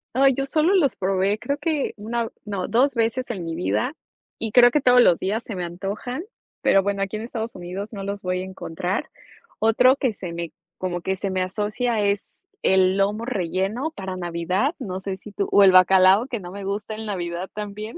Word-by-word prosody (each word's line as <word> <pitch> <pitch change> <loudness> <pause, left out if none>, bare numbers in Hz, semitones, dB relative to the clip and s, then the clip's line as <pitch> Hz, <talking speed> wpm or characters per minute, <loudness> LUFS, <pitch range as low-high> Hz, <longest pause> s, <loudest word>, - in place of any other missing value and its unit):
Ay, 270 +1 +5
yo 275 +1 -2
solo 315 +5 +2
los 305 -8 +3
probé, 195 +2 +1
creo 280 +6 -3
que 305 -2 -1
una, 230 +2 -2
o - - -8
no, 200 -4 -3
2 255 +6 +2
veces 230 +3 0
en 190 -8 -4
mi 165 - -4
vida 240 - -1 0.5
y 225 - -2
creo 245 +1 +7
que 300 - +2
todos 250 -1 +6
los 175 -8 +5
días 215 +5 -1
se 220 - -6
me 180 - -3
antojan, 200 - -5 0.4
pero 195 - +4
bueno, 200 0 -1
aquí 195 +2 -3
en - - -6
Estados 230 0 -5
Unidos 185 +3 -6
no 200 -2 -5
los 200 +1 -5
voy 180 0 -1
a - - -4
encontrar. 185 0 -4 0.5
Otro 250 +4 +5
que 255 -5 0
se 180 -4 -7
me 170 -1 -5 0.3
como 175 -1 -3
que 190 +2 -1
se 195 +1 -3
me 185 -1 0
asocia 215 +4 -1
es 200 - -2 0.2
el 190 0 +4
lomo 205 +3 0
relleno 200 - -2
para 190 -1 -5
navidad, 180 - -1
no 190 -7 -4
sé 190 0 -4
si 200 +2 -12
tú 200 0 -2
o 205 - +6
el 190 - +8
bacalao 185 +3 +6
que 245 -4 -4
no 175 -2 -9
me 200 +1 -7
gusta 205 +2 -3
en 220 +1 -6
navidad 180 -3 -3
también. 210 +1 -6
200 Hz, 215 wpm, -23 LUFS, 185-235 Hz, 0.5 s, el